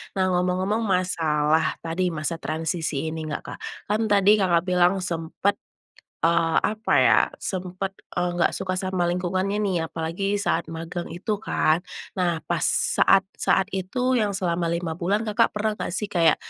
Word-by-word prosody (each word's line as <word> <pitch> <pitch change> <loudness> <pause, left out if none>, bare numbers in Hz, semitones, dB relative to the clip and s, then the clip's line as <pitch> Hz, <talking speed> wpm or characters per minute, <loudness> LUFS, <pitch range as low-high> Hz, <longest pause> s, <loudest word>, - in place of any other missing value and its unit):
Nah, 185 -1 +1
ngomong-ngomong 185 +5 0
masalah 160 -6 +1
tadi 170 +3 -1
masa 155 +1 -2
transisi 160 -1 -2
ini 160 -1 -5
enggak, 150 - -3
Kak. - - -18 0.3
Kan, 215 +2 +1
tadi 205 0 +5
Kakak 175 -3 +3
bilang 180 +1 +3
sempat, 175 +3 -1 0.7
eee, 165 -1 +2
apa 220 +2 -1
ya, - - +6 0.2
sempat, 185 +1 -4 0.2
eee, 175 0 0
enggak 175 - +2
suka 185 -1 -3
sama 185 -2 0
lingkungannya, 185 +3 -1
nih, 195 -4 0
apalagi 175 +6 -2
saat 200 -5 -1
magang 165 +2 -5
itu, 200 +5 -3
kan. 160 -5 +1 0.4
Nah, 170 -3 0
pas - - 0 0.3
saat-saat - - +3
itu 250 +7 0
yang 205 -2 0
selama 175 -3 -1
5 170 -1 -2
bulan 200 +5 +1
Kakak 210 -2 +3
pernah 215 +1 +1
enggak, - - -3
sih, 210 0 -3
kayak, 165 -3 +4
180 Hz, 155 wpm, -24 LUFS, 165-195 Hz, 0.7 s, ya